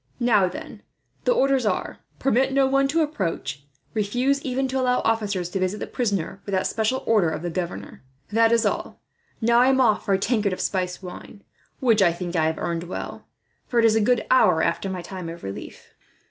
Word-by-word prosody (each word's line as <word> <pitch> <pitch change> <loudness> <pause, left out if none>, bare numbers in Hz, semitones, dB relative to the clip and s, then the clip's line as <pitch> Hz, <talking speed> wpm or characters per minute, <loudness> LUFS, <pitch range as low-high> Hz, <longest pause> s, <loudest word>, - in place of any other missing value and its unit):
"Now, 220 -6 +4
then, 180 - -8 0.4
the - - +3
orders 275 - +2
are: 210 -4 -2 0.2
'Permit 265 0 +2
no 275 0 +4
one 275 +1 +2
to 320 +3 +2
approach. 170 - -3 0.3
Refuse 245 +6 0
even 265 0 -1
to 265 +1 -1
allow 250 -1 +2
officers 205 -5 0
to 190 - -3
visit 185 +3 -1
the - - -3
prisoner, 200 -5 -2
without 190 -2 0
a - - -6
special 225 +4 0
order 210 -7 +3
of 160 - -4
the 175 - -3
governor.' 175 0 -5 0.3
That 225 +1 +4
is 235 0 +3
all. - - -2 0.4
"Now 235 +1 +4
I 250 - +5
am 265 0 +3
off 225 -5 +3
for 195 - +2
a - - +2
tankard 205 -1 0
of - - -5
spiced 185 -1 -2
wine, 185 +2 -10 0.4
which 230 -5 +3
I 175 -3 +4
think 175 0 -5
I 160 -1 +2
have 160 0 -2
earned 170 +1 -3
well, 180 - -7 0.4
for 240 - -2
it 230 - +5
is 220 -1 +4
a 220 - +3
good 245 +2 +2
hour 180 -10 +5
after 195 - -1
my 185 -2 -5
time 180 -1 -7
of 170 +1 -9
relief." 95 0 -8
210 Hz, 210 wpm, -24 LUFS, 180-250 Hz, 0.4 s, I